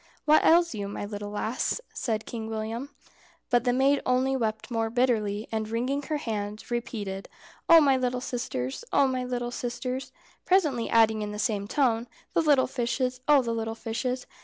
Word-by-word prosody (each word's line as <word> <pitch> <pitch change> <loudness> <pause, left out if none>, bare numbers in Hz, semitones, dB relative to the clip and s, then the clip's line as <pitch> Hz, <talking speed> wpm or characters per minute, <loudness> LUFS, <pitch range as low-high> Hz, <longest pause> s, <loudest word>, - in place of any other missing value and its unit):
"What 305 +1 +5
ails 340 -1 +5
you, 205 -2 -4
my 205 - -5
little 205 0 -6
lass?" 220 - -1
said 220 -3 -2
Kind 225 -2 -5
William. 225 +4 -4 0.6
But 245 0 +3
the 245 - +3
maid 270 +3 +3
only 255 +1 +2
wept 220 -1 -2
more 225 -1 0
bitterly, 220 -4 0
and 220 -1 -2
wringing 250 +5 -1
her 300 +2 -2
hands, 215 -4 -5
repeated, 205 -5 -4 0.4
"Oh, 335 -1 +10
my 275 -4 +4
little 250 -1 -1
sisters! 135 - -4
Oh, 280 - +4
my 255 -1 -1
little 245 -1 -3
sisters!" 250 +2 -4 0.3
presently 300 -11 +2
adding 220 -1 +4
in 210 0 -4
the - - -5
same 205 -1 -1
tone, 240 -2 +1 0.3
"The - - +3
little 290 -4 +4
fishes! 255 0 -2
Oh, 290 -3 +6
the 230 -1 -2
little 225 0 -3
fishes!" 250 +3 -3
240 Hz, 175 wpm, -27 LUFS, 220-260 Hz, 0.6 s, Oh